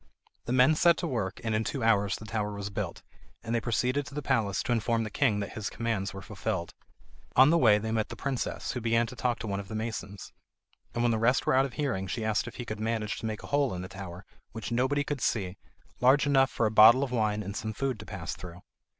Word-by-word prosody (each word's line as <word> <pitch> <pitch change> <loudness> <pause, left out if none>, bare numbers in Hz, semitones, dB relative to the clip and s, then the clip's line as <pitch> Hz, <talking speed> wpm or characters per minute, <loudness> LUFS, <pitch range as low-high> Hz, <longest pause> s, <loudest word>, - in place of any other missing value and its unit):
The - - -3
men 130 +4 +5
set 170 +2 +4
to 175 - -2
work, 110 -10 -2
and 110 -1 -1
in 110 +1 +1
two 130 +2 -3
hours 105 -3 +3
the 110 - -9
tower 105 -1 -2
was 100 0 -5
built, - - -4 0.4
and 115 0 -3
they 115 - +1
proceeded 125 +4 0
to 140 - -10
the 150 - -3
palace 110 -8 +1
to - - -3
inform 115 0 +1
the 110 - -5
king 110 -7 +1
that 100 - -5
his 110 -2 -4
commands 110 -4 -2
were 95 0 -9
fulfilled. 95 -5 -4 0.6
On 130 +4 +7
the 170 - +5
way 110 -7 +6
they 110 +1 -3
met 110 -1 0
the - - -6
princess, 135 -3 -3
who 125 - -4
began 115 +1 +2
to 115 - -9
talk 125 -1 0
to - - -7
one 100 -1 -2
of 100 - -7
the 110 - -6
masons, 110 -3 -5 0.6
and 120 - 0
when 120 - +3
the 110 - 0
rest 125 +4 +2
were - - +2
out 135 +1 +4
of 135 - -7
hearing 125 -11 -2
she 110 +4 -3
asked 110 +2 0
if 120 - -8
he 120 - -6
could 110 -2 -5
manage 110 -1 -2
to 115 - -4
make 110 -1 -5
a - - -8
hole 140 -7 +2
in 90 - -5
the - - -6
tower, 95 -1 -9 0.3
which 115 +1 -6
nobody 130 +4 +1
could 145 -3 -4
see, 100 -6 -1 0.4
large 135 +4 +5
enough 135 -2 +4
for 115 - 0
a 105 - +1
bottle 110 +5 +8
of 135 - -3
wine 105 -3 0
and 100 +1 -6
some 110 0 -3
food 130 +1 -2
to 105 - -9
pass 85 -3 -5
through. 90 0 -10
115 Hz, 260 wpm, -29 LUFS, 105-125 Hz, 0.6 s, bottle